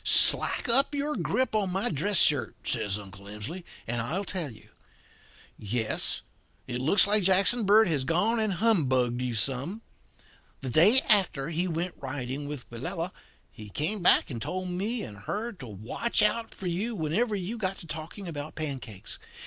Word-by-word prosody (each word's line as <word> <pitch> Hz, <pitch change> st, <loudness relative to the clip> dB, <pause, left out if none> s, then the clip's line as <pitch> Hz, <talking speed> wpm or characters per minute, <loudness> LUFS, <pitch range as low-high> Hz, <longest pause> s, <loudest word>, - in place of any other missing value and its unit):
"'Slack -, -, +7 dB
up 270 Hz, +5 st, +3 dB
your 290 Hz, +1 st, -2 dB
grip 260 Hz, -2 st, -1 dB
in 210 Hz, -3 st, +1 dB
my 195 Hz, +5 st, -1 dB
dress 180 Hz, +6 st, -1 dB
shirt,' 145 Hz, -5 st, +2 dB
says 100 Hz, 0 st, -1 dB
Uncle 100 Hz, -1 st, -12 dB
Emsley, 105 Hz, -, -7 dB, 0.2 s
'and 120 Hz, 0 st, -2 dB
I'll 160 Hz, +12 st, -2 dB
tell 175 Hz, -7 st, -3 dB
you. 110 Hz, -, -17 dB, 0.9 s
Yes, 110 Hz, +1 st, -2 dB, 0.4 s
it 125 Hz, +1 st, -4 dB
looks 160 Hz, +10 st, +6 dB
like 210 Hz, +1 st, +4 dB
Jackson 195 Hz, +5 st, +3 dB
Bird 215 Hz, +1 st, +6 dB
has 150 Hz, -6 st, 0 dB
gone 190 Hz, -, +1 dB
and 215 Hz, -3 st, 0 dB
humbugged 130 Hz, -, +1 dB
you 125 Hz, -2 st, -2 dB
some. 135 Hz, -, 0 dB, 0.8 s
The 130 Hz, -2 st, -4 dB
day 205 Hz, -, +6 dB
after 175 Hz, -9 st, +2 dB
he 170 Hz, +3 st, -1 dB
went 175 Hz, +1 st, -3 dB
riding 135 Hz, +1 st, -5 dB
with 145 Hz, -3 st, -7 dB
Willella 165 Hz, -, -3 dB, 0.4 s
he 105 Hz, -3 st, -12 dB
came 165 Hz, -, 0 dB
back 175 Hz, -, +4 dB
and 115 Hz, -3 st, -6 dB
told 185 Hz, +8 st, -4 dB
me 205 Hz, +6 st, -2 dB
and 105 Hz, -, -8 dB
her 210 Hz, -, -4 dB
to 160 Hz, -, -11 dB
watch 115 Hz, -, -1 dB
out 225 Hz, +2 st, +1 dB
for 195 Hz, -, -10 dB
you 195 Hz, +7 st, -2 dB
whenever 205 Hz, +7 st, -1 dB
you 200 Hz, +5 st, -5 dB
got 195 Hz, -2 st, -2 dB
to -, -, -11 dB
talking 165 Hz, +5 st, -6 dB
about 150 Hz, -2 st, -6 dB
pancakes. 130 Hz, -, -6 dB
170 Hz, 170 wpm, -27 LUFS, 130-205 Hz, 0.9 s, Slack